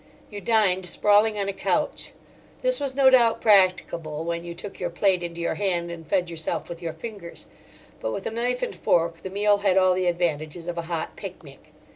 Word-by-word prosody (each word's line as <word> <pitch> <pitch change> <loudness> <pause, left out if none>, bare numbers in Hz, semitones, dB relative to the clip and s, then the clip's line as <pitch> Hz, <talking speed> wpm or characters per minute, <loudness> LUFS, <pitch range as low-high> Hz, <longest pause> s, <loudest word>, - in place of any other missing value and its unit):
You 205 -1 -7
dined 190 -3 +2
sprawling 210 +3 +3
on 200 -1 -1
a 200 - -2
couch. - - -1 0.5
This - - +2
was 270 -2 -3
no 270 -1 +6
doubt 235 -3 +5
practicable 180 -6 +2
when 170 0 -3
you 170 0 -7
took 195 +3 -8
your 175 - -2
plate 180 +1 +1
into 170 -1 -5
your 170 - 0
hand 175 -4 -1
and 165 -2 -9
fed 180 -1 +1
yourself 165 0 -4
with 170 0 -7
your 165 -1 -3
fingers; 205 -7 -9 0.5
but 110 - -3
with 190 - -5
a - - -2
knife 245 +2 -1
and - - -2
fork 165 -1 +1
the 190 - -6
meal 205 +1 +2
had 195 -2 +2
all 185 -1 +5
the 185 0 0
advantages 170 -1 -2
of 175 -1 -3
a 170 0 -6
hot 165 -2 -3
picnic. - - -11
185 Hz, 205 wpm, -25 LUFS, 170-205 Hz, 0.5 s, no